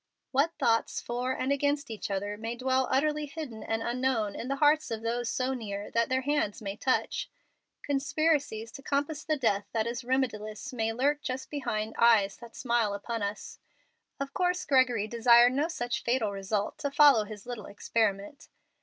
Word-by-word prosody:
What 290 +5 +1
thoughts 230 0 +1
for 245 +2 -2
and 260 +1 -1
against 285 -1 0
each 215 - -5
other 205 +1 -2
may 225 +2 -4
dwell 260 +1 +1
utterly 300 +2 +1
hidden 280 -7 -7
and 225 0 -2
unknown 240 -4 0
in 240 - -5
the 275 - -1
hearts 300 +2 +3
of 225 -1 -4
those 235 +1 -1
so 255 +1 0
near 205 -5 -5
that 230 0 +1
their 260 0 +1
hands 285 -7 0
may 200 -2 -5
touch! 265 - -1 0.5
Conspiracies 285 -5 0
to 275 - -10
compass 290 +2 -1
the 310 -1 0
death 205 -6 +1
that 220 -1 +1
is 235 0 -3
remediless 235 -3 -2
may 225 -2 0
lurk 285 +5 +1
just 265 -2 -5
behind 225 -6 -2
eyes 215 -4 +5
that 235 -1 -13
smile 235 -5 0
upon 230 +3 -4
us. 200 +1 -5 0.6
Of 275 0 -4
course 360 0 0
Gregory 255 -6 +3
desired 235 +2 +6
no 290 +4 +1
such 245 -7 -3
fatal 235 -4 0
result 200 +6 -2
to 290 -2 -1
follow 280 -6 +6
his 210 -1 -10
little 240 -4 -6
experiment. 205 +4 -2
240 Hz, 175 wpm, -29 LUFS, 220-275 Hz, 0.6 s, desired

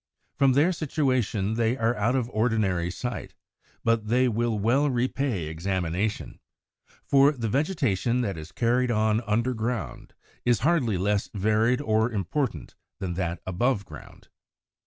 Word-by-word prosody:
From 135 -2 +3
their 150 +7 +4
situation 130 - 0
they 115 +2 +1
are 115 0 +1
out 115 +5 +1
of 125 -3 0
ordinary 110 -7 +1
sight; 120 +7 -5 0.5
but 115 -2 +1
they 125 +3 +3
will 115 -1 0
well 130 +8 +2
repay 125 - -1
examination. 90 +5 -2 0.7
For 140 +1 +5
the 120 -5 -3
vegetation 125 - 0
that 100 -6 -2
is 80 0 -9
carried 125 +1 +1
on 110 -1 +2
under 115 +4 +1
ground 115 +1 -4 0.3
is 120 -4 +2
hardly 135 - +2
less 100 +2 0
varied 110 +6 +2
or 110 -2 +1
important 110 - -2 0.2
than 95 -3 -3
that 85 -1 -3
above 100 +3 0
ground. - - -13
115 Hz, 135 wpm, -26 LUFS, 100-125 Hz, 0.7 s, For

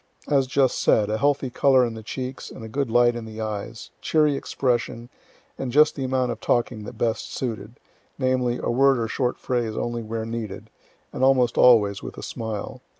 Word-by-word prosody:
As 135 -3 +2
just 135 -1 +2
said, 105 -1 +3
a 110 - -1
healthy 140 -2 +1
color 130 0 +4
in 115 - -4
the 110 - -8
cheeks, 130 +4 -6
and 110 -2 -9
good 140 0 -1
light 120 +1 +4
in 120 -1 -5
the 110 0 -9
eyes, 110 +1 -5
cheery 150 -2 +2
expression, 120 -3 -2 0.5
and 130 -2 -3
just 150 +3 +5
the 135 - -4
amount 130 -1 0
of 115 - -7
talking 120 -3 0
that - - -9
best 115 -1 -1
suited, 115 -2 -5 0.4
namely, 130 -2 0
a - - 0
word 135 +2 +4
or 115 -1 -1
short 125 +2 -1
phrase 120 -4 -2
only 120 0 -2
where 110 0 -4
needed, 115 -3 -6 0.4
and 130 - -2
almost 130 -3 +4
always 105 -5 +5
with - - -8
a - - -7
smile. 110 -3 -5
120 Hz, 190 wpm, -24 LUFS, 110-130 Hz, 0.5 s, just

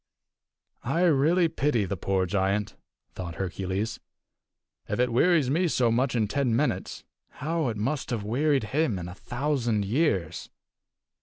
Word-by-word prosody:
"I 140 +8 0
really 165 +2 +4
pity 145 -8 0
the 95 +2 -3
poor 95 +1 0
giant," 100 +2 0 0.4
thought 85 -3 -6
Hercules. 95 +4 -3 0.9
"If - - -2
it 125 -1 +2
wearies 150 0 +3
me 175 +5 +2
so 125 -7 +2
much 125 +2 +1
in 110 -3 +1
ten 130 -1 0
minutes, 120 -8 -1 0.3
how 160 +1 -1
it 110 -3 -2
must 135 +7 -2
have 115 -5 -2
wearied 135 +5 +1
him 145 -9 +1
in 90 -1 -5
a 90 - -7
thousand 120 -2 -1
years!" 100 - 0
120 Hz, 145 wpm, -27 LUFS, 100-150 Hz, 0.9 s, really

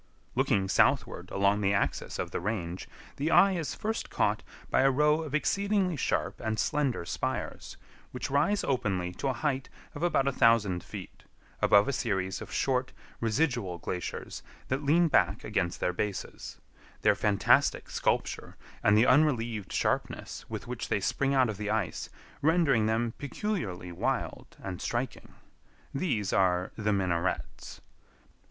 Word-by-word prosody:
Looking 95 -1 +2
southward - - +2
along 100 +1 +2
the 100 0 +2
axis 70 -8 -1
of - - -3
the - - -2
range, 90 -3 -3 0.3
the 145 +3 0
eye 195 +3 +6
is 170 -5 -2
first 220 +1 -3
caught - - +1 0.3
by - - +4
a 135 - +5
row 150 +3 +3
of 155 -3 -4
exceedingly 200 +2 +1
sharp 135 - -1
and 110 -1 -1
slender 135 -6 0
spires, - - -4 0.3
which 125 +2 -4
rise 150 +9 +2
openly 95 -9 0
to 135 - -3
a 135 - +1
height 135 +1 -2 0.2
of 145 - -7
about 155 -6 +2
a - - +3
thousand 110 -8 +3
feet, - - -9 0.4
above 100 0 +5
a 140 - 0
series 95 -7 -1
of - - -8
short, 130 -1 0 0.3
residual 115 - 0
glaciers 90 +1 -5 0.3
that 130 +2 0
lean 165 +4 +4
back 95 - +2
against 85 -6 -1
their 90 - 0
bases; 100 +1 -4 0.5
their - - +6
fantastic 100 -2 +3
sculpture - - -1 0.2
and 105 0 +4
the 110 - +6
unrelieved 120 - +2
sharpness - - -2
with - - -5
which - - -5
they - - +1
spring 140 0 0
out 130 -2 +4
of 110 -3 -4
the 105 0 -3
ice 110 -4 -1 0.3
rendering 145 -8 +3
them 115 +1 0
peculiarly 130 - -3
wild 85 - -3
and 95 -2 -5
striking. 120 +2 -3 0.6
These 115 - -1
are 90 -2 +2
"The 105 -1 0
Minarets." 95 -3 -2
115 Hz, 150 wpm, -29 LUFS, 95-140 Hz, 0.6 s, eye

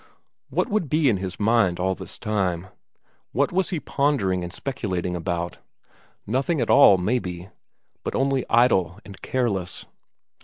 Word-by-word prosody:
What - - 0
would 205 -8 -1
be 155 -2 +3
in 105 - +2
his 95 -1 -6
mind 105 -5 +2
all 95 +1 +1
this 95 -1 -7
time 95 -4 -1 0.6
what 140 +2 +1
was 185 +1 +1
he 175 - -2
pondering 115 -13 0
and 85 - -6
speculating 90 -7 -3
about? 85 0 -3 0.7
Nothing 135 - 0
at 120 - +1
all, 120 -8 +8
maybe, 90 -3 -2 0.5
but - - -3
only 135 -1 +1
idle 95 -8 +3
and 100 - -12
careless? 100 -9 -2
100 Hz, 145 wpm, -24 LUFS, 90-130 Hz, 0.7 s, all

